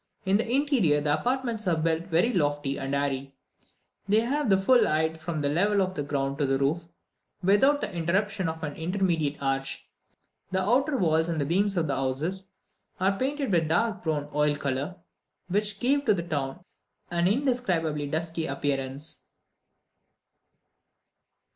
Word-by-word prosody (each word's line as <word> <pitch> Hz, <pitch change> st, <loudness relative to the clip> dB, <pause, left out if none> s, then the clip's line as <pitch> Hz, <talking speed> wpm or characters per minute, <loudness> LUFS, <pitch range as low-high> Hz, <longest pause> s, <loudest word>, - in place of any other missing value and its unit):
In 190 Hz, +1 st, +3 dB
the 230 Hz, +1 st, -1 dB
interior, 255 Hz, -, +3 dB
the 145 Hz, 0 st, +1 dB
apartments 240 Hz, -4 st, -1 dB
are 170 Hz, -2 st, +2 dB
built 165 Hz, +1 st, 0 dB
very 185 Hz, +8 st, +2 dB
lofty 145 Hz, -4 st, 0 dB
and 135 Hz, 0 st, -2 dB
airy: 135 Hz, -1 st, -2 dB, 0.7 s
they 215 Hz, +2 st, +5 dB
have 270 Hz, +2 st, -1 dB
the 195 Hz, -, +5 dB
full 240 Hz, +6 st, +4 dB
height 160 Hz, +1 st, 0 dB
from 160 Hz, -2 st, -3 dB
the 145 Hz, -, +1 dB
level 200 Hz, +8 st, +2 dB
of 185 Hz, -1 st, +1 dB
the 150 Hz, -, -3 dB
ground 140 Hz, 0 st, -2 dB
to 145 Hz, -, +2 dB
the 135 Hz, 0 st, +2 dB
roof, 150 Hz, +5 st, 0 dB, 0.6 s
without 265 Hz, +10 st, +4 dB
the 205 Hz, -3 st, -3 dB
interruption 190 Hz, +2 st, 0 dB
of 160 Hz, 0 st, -6 dB
an 150 Hz, -2 st, -4 dB
intermediate 165 Hz, -4 st, -1 dB
arch. 135 Hz, 0 st, -2 dB, 0.6 s
The 190 Hz, -, 0 dB
outer 270 Hz, +7 st, +2 dB
walls 160 Hz, -4 st, +2 dB
and 155 Hz, -4 st, -1 dB
beams 195 Hz, +4 st, +1 dB
of 165 Hz, -, +2 dB
the 140 Hz, -, -1 dB
houses 160 Hz, +9 st, -2 dB, 0.5 s
are 190 Hz, +2 st, +2 dB
painted 275 Hz, +2 st, -1 dB
with 165 Hz, -2 st, +3 dB
a -, -, -4 dB
dark 215 Hz, +5 st, +1 dB
brown 150 Hz, -3 st, -1 dB
oil 150 Hz, 0 st, +2 dB
colour, 140 Hz, +4 st, -3 dB, 0.5 s
which 205 Hz, +1 st, 0 dB
gave 280 Hz, +3 st, +2 dB
to 215 Hz, -4 st, +4 dB
the 170 Hz, -, -3 dB
town 145 Hz, +1 st, -3 dB, 0.5 s
an 175 Hz, 0 st, +2 dB
indescribably 190 Hz, -, 0 dB
dusky 160 Hz, +2 st, -2 dB
appearance. 140 Hz, +1 st, -3 dB
170 Hz, 160 wpm, -27 LUFS, 145-205 Hz, 0.7 s, they